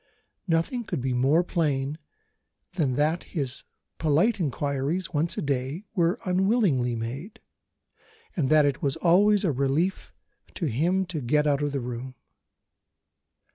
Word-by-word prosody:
Nothing 170 Hz, +9 st, 0 dB
could 210 Hz, -, -3 dB
be 130 Hz, 0 st, -1 dB
more 135 Hz, +7 st, +3 dB
plain 150 Hz, -4 st, -1 dB, 0.7 s
than 150 Hz, -8 st, 0 dB
that 155 Hz, +5 st, +1 dB
his 140 Hz, -6 st, -4 dB, 0.3 s
polite 165 Hz, +8 st, +2 dB
inquiries 145 Hz, +3 st, -2 dB
(once 160 Hz, +3 st, 0 dB
a -, -, -2 dB
day) 140 Hz, +6 st, -2 dB
were 180 Hz, +2 st, +1 dB
unwillingly 185 Hz, -, +2 dB
made, 135 Hz, -, -6 dB, 1.0 s
and 145 Hz, -7 st, 0 dB
that 155 Hz, -1 st, +5 dB
it 140 Hz, -2 st, 0 dB
was 140 Hz, -2 st, 0 dB
always 195 Hz, +5 st, +4 dB
a 180 Hz, -, +2 dB
relief 140 Hz, +8 st, -1 dB, 0.4 s
to 175 Hz, -, -2 dB
him 170 Hz, +9 st, +1 dB
to 170 Hz, -4 st, -4 dB
get 150 Hz, +5 st, +2 dB
out 145 Hz, -1 st, +2 dB
of 145 Hz, -1 st, 0 dB
the 140 Hz, -, -2 dB
room. 125 Hz, +2 st, -6 dB
150 Hz, 135 wpm, -26 LUFS, 135-180 Hz, 1.0 s, that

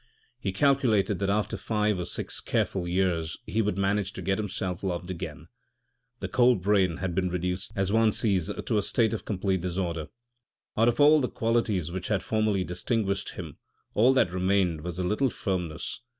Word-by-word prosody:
He 95 Hz, -, -2 dB
calculated 110 Hz, -, +2 dB
that 100 Hz, -1 st, 0 dB
after 105 Hz, +1 st, 0 dB
five 105 Hz, -3 st, 0 dB
or 90 Hz, -, -2 dB
six -, -, -2 dB
careful 90 Hz, -3 st, -1 dB
years 85 Hz, -3 st, 0 dB
he 115 Hz, -, 0 dB
would 105 Hz, -3 st, -1 dB
manage 100 Hz, 0 st, 0 dB
to -, -, -7 dB
get 95 Hz, +1 st, 0 dB
himself 95 Hz, -3 st, -3 dB
loved 90 Hz, -1 st, -3 dB
again. 90 Hz, -, -6 dB, 0.8 s
This -, -, -4 dB
cold 120 Hz, -6 st, +4 dB
brain 95 Hz, -5 st, +2 dB
had 95 Hz, -2 st, -3 dB
been 90 Hz, +1 st, 0 dB
reduced, 90 Hz, +1 st, -2 dB
as 95 Hz, 0 st, 0 dB
one 110 Hz, 0 st, +4 dB
sees, 95 Hz, -6 st, +2 dB
to -, -, -2 dB
a -, -, +1 dB
state 115 Hz, +2 st, +1 dB
of 110 Hz, -, -4 dB
complete 95 Hz, -2 st, -1 dB
disorder. 85 Hz, -3 st, -2 dB, 0.7 s
Out 115 Hz, +2 st, +3 dB
of 120 Hz, 0 st, +1 dB
all 150 Hz, +1 st, +7 dB
the 125 Hz, -, 0 dB
qualities 110 Hz, -7 st, 0 dB
which 95 Hz, +1 st, -4 dB
had 105 Hz, -3 st, 0 dB
formerly 110 Hz, -3 st, +1 dB
distinguished 100 Hz, +3 st, -2 dB
him, -, -, -8 dB, 0.3 s
all 120 Hz, +5 st, +5 dB
that 110 Hz, -9 st, +3 dB
remained 90 Hz, -3 st, +1 dB
was 90 Hz, +1 st, -5 dB
a 90 Hz, -, -1 dB
little 105 Hz, +8 st, +1 dB
firmness. 90 Hz, -7 st, -3 dB
95 Hz, 180 wpm, -27 LUFS, 90-110 Hz, 0.8 s, all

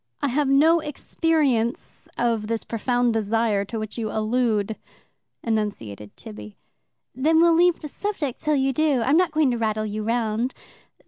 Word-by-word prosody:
"I 285 Hz, -, 0 dB
have 285 Hz, +3 st, +1 dB
no 310 Hz, +5 st, +5 dB
experience 295 Hz, -5 st, -1 dB
of 230 Hz, -3 st, 0 dB
this 225 Hz, 0 st, -2 dB
profound 245 Hz, +1 st, 0 dB
desire 220 Hz, -1 st, +1 dB
to 225 Hz, +3 st, -6 dB
which 215 Hz, +1 st, -5 dB
you 220 Hz, -2 st, -2 dB
allude," 220 Hz, -1 st, 0 dB, 0.7 s
enunciated 195 Hz, -, -3 dB
Tibby. 105 Hz, -1 st, -10 dB, 0.6 s
"Then 310 Hz, +6 st, +2 dB
we'll 335 Hz, 0 st, +5 dB
leave 350 Hz, +1 st, +3 dB
the 305 Hz, -, -5 dB
subject 305 Hz, -, -4 dB
till 305 Hz, -1 st, +1 dB
you 270 Hz, -1 st, +1 dB
do. 290 Hz, -4 st, +2 dB
I'm 275 Hz, -, +3 dB
not 360 Hz, -1 st, +2 dB
going 305 Hz, -4 st, +2 dB
to 240 Hz, -, -2 dB
rattle 215 Hz, -1 st, -1 dB
you 215 Hz, 0 st, -4 dB
round. 230 Hz, +2 st, -1 dB
240 Hz, 155 wpm, -23 LUFS, 215-295 Hz, 0.7 s, no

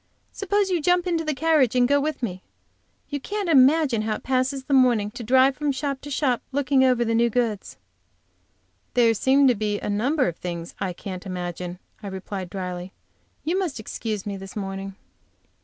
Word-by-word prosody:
Suppose 400 Hz, 0 st, 0 dB
you 350 Hz, -3 st, +1 dB
jump 355 Hz, +2 st, +2 dB
into 335 Hz, -2 st, 0 dB
the 305 Hz, -2 st, -1 dB
carriage 300 Hz, -5 st, +3 dB
and 245 Hz, -1 st, +4 dB
go 285 Hz, +1 st, +3 dB
with 300 Hz, -3 st, -3 dB
me? 185 Hz, -5 st, -3 dB, 0.7 s
You 285 Hz, -, -3 dB
can't 410 Hz, +6 st, -3 dB
imagine 275 Hz, -4 st, +4 dB
how 215 Hz, 0 st, -1 dB
it -, -, -9 dB
passes 265 Hz, +1 st, 0 dB
away -, -, -27 dB
the -, -, +1 dB
morning 240 Hz, -6 st, +4 dB
to 235 Hz, -, -7 dB
drive 260 Hz, +3 st, +4 dB
from 295 Hz, +1 st, -1 dB
shop 275 Hz, 0 st, -3 dB
to 290 Hz, -, -8 dB
shop 260 Hz, -3 st, 0 dB
looking 275 Hz, -1 st, +2 dB
over 250 Hz, -2 st, +3 dB
the 230 Hz, -, 0 dB
new 235 Hz, +1 st, +3 dB
goods." 230 Hz, -3 st, -2 dB, 1.2 s
"There 235 Hz, -2 st, +5 dB
seem 270 Hz, +5 st, +4 dB
to 250 Hz, -, +5 dB
be 210 Hz, -1 st, -2 dB
a -, -, -3 dB
number 255 Hz, +7 st, +1 dB
of 170 Hz, -, -3 dB
things 170 Hz, -1 st, -6 dB
I 190 Hz, -2 st, -1 dB
can't 185 Hz, +1 st, -7 dB
imagine," 180 Hz, -1 st, -5 dB, 0.2 s
I 205 Hz, -, -7 dB
replied, 190 Hz, -1 st, -6 dB
dryly. 180 Hz, -1 st, -5 dB, 0.5 s
"You 350 Hz, +5 st, 0 dB
must 340 Hz, -, -2 dB
excuse 215 Hz, -1 st, -4 dB
me 200 Hz, -1 st, -4 dB
this 195 Hz, 0 st, -10 dB
morning." 195 Hz, -1 st, -5 dB
245 Hz, 190 wpm, -24 LUFS, 200-285 Hz, 1.2 s, There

